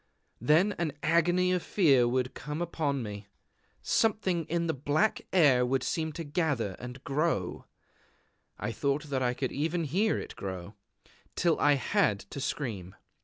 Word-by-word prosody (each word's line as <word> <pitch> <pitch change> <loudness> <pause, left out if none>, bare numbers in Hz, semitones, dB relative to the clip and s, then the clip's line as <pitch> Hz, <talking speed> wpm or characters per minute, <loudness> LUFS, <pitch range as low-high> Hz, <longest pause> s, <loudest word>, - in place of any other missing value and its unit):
Then 160 - +4
an 160 -4 -1
agony 175 +3 +3
of 180 - 0
fear 140 -13 +4
would 125 +1 0
come 150 +3 -5
upon 150 -6 -1
me. 105 -1 -7 0.6
Something 190 -7 +1
in 170 +2 -1
the 160 - 0
black 145 +10 +1
air 145 -9 +5
would 130 +1 0
seem 160 -1 -1
to 165 - -5
gather 145 - -1
and 125 +2 -8
grow 140 - -1 0.9
(I - - -3
thought 140 +1 -2
that 130 -1 0
I 125 -1 +1
could 130 0 -2
even 165 +4 -1
hear 190 +9 +1
it - - -7
grow) 95 0 -6 0.6
till 170 -2 +2
I 145 - +5
had 105 -6 +1
to 140 - -5
scream. 110 -11 -4
145 Hz, 155 wpm, -29 LUFS, 125-170 Hz, 0.9 s, air